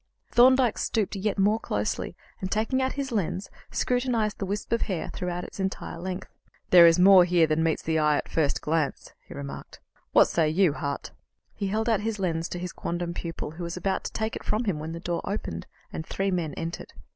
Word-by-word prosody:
Thorndyke 250 Hz, -1 st, +5 dB
stooped 215 Hz, -3 st, 0 dB
yet 200 Hz, +1 st, -1 dB
more 205 Hz, +3 st, +3 dB
closely, 105 Hz, -, -2 dB, 0.2 s
and, 190 Hz, -, -4 dB
taking 225 Hz, +5 st, +1 dB
out 260 Hz, 0 st, 0 dB
his 275 Hz, -2 st, -3 dB
lens, 195 Hz, -3 st, -2 dB, 0.2 s
scrutinized 245 Hz, -4 st, 0 dB
the 195 Hz, -, -2 dB
wisp 205 Hz, +2 st, -4 dB
of 230 Hz, -, +2 dB
hair 185 Hz, -6 st, -2 dB
throughout 180 Hz, -1 st, -3 dB
its -, -, -10 dB
entire 190 Hz, -3 st, -3 dB
length. 185 Hz, +1 st, -5 dB, 0.4 s
"There 175 Hz, -2 st, +10 dB
is 165 Hz, 0 st, +5 dB
more 185 Hz, 0 st, +8 dB
here 175 Hz, -2 st, +4 dB
than 155 Hz, 0 st, +1 dB
meets 160 Hz, -1 st, 0 dB
the 160 Hz, 0 st, +1 dB
eye 150 Hz, -1 st, +3 dB
at -, -, -2 dB
the -, -, -16 dB
first 155 Hz, -3 st, +1 dB
glance," 155 Hz, -2 st, -1 dB
he -, -, -10 dB
remarked. 140 Hz, -1 st, -8 dB, 0.3 s
"What -, -, +7 dB
say 160 Hz, -2 st, +1 dB
you, 170 Hz, -1 st, +3 dB
Hart?" 140 Hz, -2 st, -4 dB, 0.4 s
He 200 Hz, -, -3 dB
held 220 Hz, +3 st, -1 dB
out 225 Hz, -3 st, +3 dB
his 220 Hz, 0 st, -2 dB
lens 165 Hz, -4 st, -1 dB
to -, -, -4 dB
his 180 Hz, 0 st, -5 dB
quondam 170 Hz, 0 st, -3 dB
pupil, 165 Hz, -3 st, -5 dB
who 170 Hz, +3 st, -7 dB
was 170 Hz, +1 st, -4 dB
about 190 Hz, +1 st, -1 dB
to -, -, -3 dB
take 220 Hz, 0 st, -2 dB
it -, -, -6 dB
from 215 Hz, +3 st, 0 dB
him 195 Hz, -9 st, -1 dB
when 160 Hz, +2 st, -5 dB
the 165 Hz, -, -5 dB
door 170 Hz, 0 st, -2 dB
opened, 140 Hz, -, -4 dB, 0.3 s
and -, -, -4 dB
three 195 Hz, +4 st, -2 dB
men 165 Hz, -5 st, -2 dB
entered. 165 Hz, +1 st, -6 dB
180 Hz, 215 wpm, -27 LUFS, 165-210 Hz, 0.4 s, There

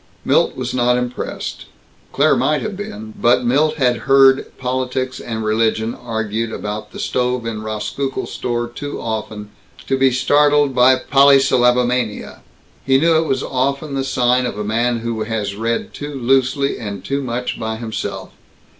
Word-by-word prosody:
Milt -, -, +2 dB
was 125 Hz, -1 st, -4 dB
not 125 Hz, -1 st, +2 dB
impressed. 125 Hz, 0 st, -4 dB, 0.5 s
Claire -, -, +3 dB
might 150 Hz, -1 st, +1 dB
have 215 Hz, -2 st, -4 dB
been, 110 Hz, -, -7 dB
but 120 Hz, +1 st, +3 dB
Milt 145 Hz, +6 st, +2 dB
had 125 Hz, -4 st, +2 dB
heard 135 Hz, -1 st, +5 dB
politics 130 Hz, 0 st, -2 dB
and 110 Hz, -2 st, -4 dB
religion 110 Hz, +1 st, +1 dB
argued 110 Hz, -1 st, -3 dB
about 105 Hz, 0 st, -5 dB
the -, -, -10 dB
stove 125 Hz, -1 st, -1 dB
in 110 Hz, -2 st, -4 dB
Rauskukle's 110 Hz, +5 st, -4 dB
store 120 Hz, -1 st, -2 dB
too 145 Hz, +5 st, -6 dB
often 110 Hz, -2 st, -5 dB, 0.3 s
to 135 Hz, -, 0 dB
be 135 Hz, 0 st, +4 dB
startled 145 Hz, +2 st, +3 dB
by 130 Hz, +1 st, +5 dB
polysyllabomania. 125 Hz, -4 st, +3 dB, 0.4 s
He 135 Hz, 0 st, +3 dB
knew 165 Hz, +3 st, +3 dB
it 160 Hz, 0 st, +2 dB
was 135 Hz, 0 st, 0 dB
often 140 Hz, +3 st, -2 dB
the 135 Hz, -1 st, -1 dB
sign 125 Hz, -1 st, +1 dB
of 110 Hz, -, -5 dB
a 105 Hz, -, -3 dB
man 115 Hz, +2 st, 0 dB
who 115 Hz, -1 st, -3 dB
has 110 Hz, -2 st, -3 dB
read 115 Hz, +2 st, -2 dB
too 145 Hz, 0 st, -6 dB
loosely 135 Hz, +2 st, +1 dB
and 100 Hz, -3 st, -6 dB
too 140 Hz, +1 st, -1 dB
much 125 Hz, -1 st, -3 dB
by 110 Hz, 0 st, -3 dB
himself. 110 Hz, -1 st, -5 dB
125 Hz, 155 wpm, -19 LUFS, 110-135 Hz, 0.5 s, heard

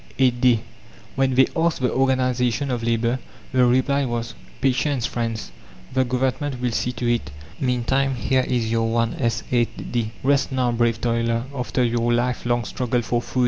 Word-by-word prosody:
a 130 Hz, -2 st, +5 dB
day! 120 Hz, -2 st, +3 dB, 0.5 s
When 135 Hz, -1 st, +1 dB
they 130 Hz, +1 st, +6 dB
asked 165 Hz, 0 st, +1 dB
the 125 Hz, -1 st, 0 dB
"Organization 130 Hz, -1 st, +1 dB
of 120 Hz, -2 st, -1 dB
Labour," 115 Hz, +2 st, 0 dB, 0.3 s
the 125 Hz, -1 st, +4 dB
reply 130 Hz, +3 st, +2 dB
was: 120 Hz, -2 st, -3 dB, 0.3 s
"Patience, 135 Hz, -1 st, +1 dB
friends, 115 Hz, -, -3 dB, 0.4 s
the 130 Hz, 0 st, +3 dB
Government 130 Hz, +2 st, -1 dB
will 125 Hz, -1 st, 0 dB
see 125 Hz, +2 st, -1 dB
to 125 Hz, -, -4 dB
it; 120 Hz, -9 st, 0 dB, 0.3 s
meantime 130 Hz, +1 st, +1 dB
here 130 Hz, +1 st, +1 dB
is 115 Hz, -3 st, 0 dB
your 115 Hz, 0 st, +1 dB
1s. 115 Hz, 0 st, 0 dB
8d. 120 Hz, -1 st, -1 dB
Rest 140 Hz, +1 st, +2 dB
now, 130 Hz, -2 st, +1 dB
brave 115 Hz, -1 st, +1 dB
toiler, 115 Hz, 0 st, 0 dB
after 125 Hz, 0 st, -1 dB
your 120 Hz, 0 st, +1 dB
life 120 Hz, +1 st, 0 dB
long 120 Hz, -1 st, +1 dB
struggle 125 Hz, +2 st, -1 dB
for 120 Hz, +1 st, 0 dB
food!" 130 Hz, -, -4 dB
125 Hz, 165 wpm, -23 LUFS, 115-130 Hz, 0.5 s, they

